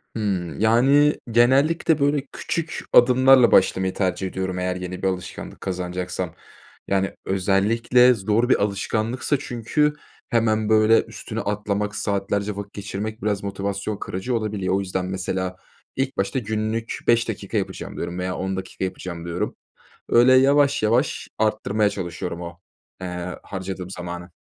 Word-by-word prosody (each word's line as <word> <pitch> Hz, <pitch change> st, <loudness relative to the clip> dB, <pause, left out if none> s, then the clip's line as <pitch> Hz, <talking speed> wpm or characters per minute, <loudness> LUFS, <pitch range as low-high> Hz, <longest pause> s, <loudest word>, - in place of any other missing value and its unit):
Hımm. 95 Hz, -6 st, -2 dB
Yani, 135 Hz, +7 st, +4 dB
genellikle, 140 Hz, +7 st, +3 dB
böyle, 145 Hz, 0 st, +1 dB
küçük 165 Hz, -1 st, -4 dB
adımlarla 130 Hz, +1 st, +6 dB
başlamayı 95 Hz, 0 st, +3 dB
tercih 95 Hz, -1 st, -1 dB
ediyorum, 95 Hz, 0 st, -3 dB
eğer 90 Hz, 0 st, -1 dB
yeni 90 Hz, 0 st, -6 dB
bir -, -, +3 dB
alışkanlık 90 Hz, -2 st, -5 dB
kazanacaksam. 90 Hz, -1 st, -4 dB, 0.5 s
Yani, 95 Hz, -1 st, 0 dB
özellikle 110 Hz, +6 st, +3 dB
zor 110 Hz, +3 st, +1 dB
bir -, -, +4 dB
alışkanlıksa 110 Hz, +7 st, -1 dB
çünkü 140 Hz, +4 st, 0 dB, 0.4 s
hemen 110 Hz, -2 st, +1 dB
böyle 110 Hz, +1 st, +5 dB
üstüne -, -, -7 dB
atlamak, 105 Hz, 0 st, -2 dB
saatlerce 100 Hz, 0 st, -1 dB
vakit 100 Hz, 0 st, -7 dB
geçirmek 105 Hz, +2 st, -5 dB
biraz 100 Hz, -1 st, -1 dB
motivasyon 100 Hz, +1 st, -3 dB
kırıcı 95 Hz, +8 st, -3 dB
olabiliyor. 105 Hz, -4 st, -1 dB
O -, -, +1 dB
yüzden, 95 Hz, -1 st, -2 dB
mesela, 95 Hz, 0 st, -3 dB, 0.4 s
ilk 135 Hz, 0 st, -2 dB
başta 100 Hz, +7 st, 0 dB
günlük 110 Hz, +1 st, -2 dB
5 115 Hz, 0 st, +3 dB
dakika 105 Hz, 0 st, -3 dB
yapacağım 95 Hz, -2 st, -4 dB
diyorum 90 Hz, +1 st, -4 dB
veya 90 Hz, 0 st, -2 dB
10 95 Hz, 0 st, -2 dB
dakika 95 Hz, 0 st, -6 dB
yapacağım 85 Hz, -2 st, -6 dB
diyorum. 85 Hz, +1 st, -3 dB, 0.5 s
Öyle 120 Hz, +2 st, +6 dB
yavaş 140 Hz, +1 st, +4 dB
yavaş 115 Hz, +6 st, +1 dB
arttırmaya 105 Hz, -1 st, +1 dB
çalışıyorum 85 Hz, -2 st, -5 dB
o, 85 Hz, 0 st, -8 dB, 0.4 s
eee, 90 Hz, 0 st, -5 dB
harcadığım 95 Hz, -1 st, -6 dB
zamanı. 90 Hz, -1 st, -7 dB
100 Hz, 135 wpm, -23 LUFS, 95-115 Hz, 0.5 s, adımlarla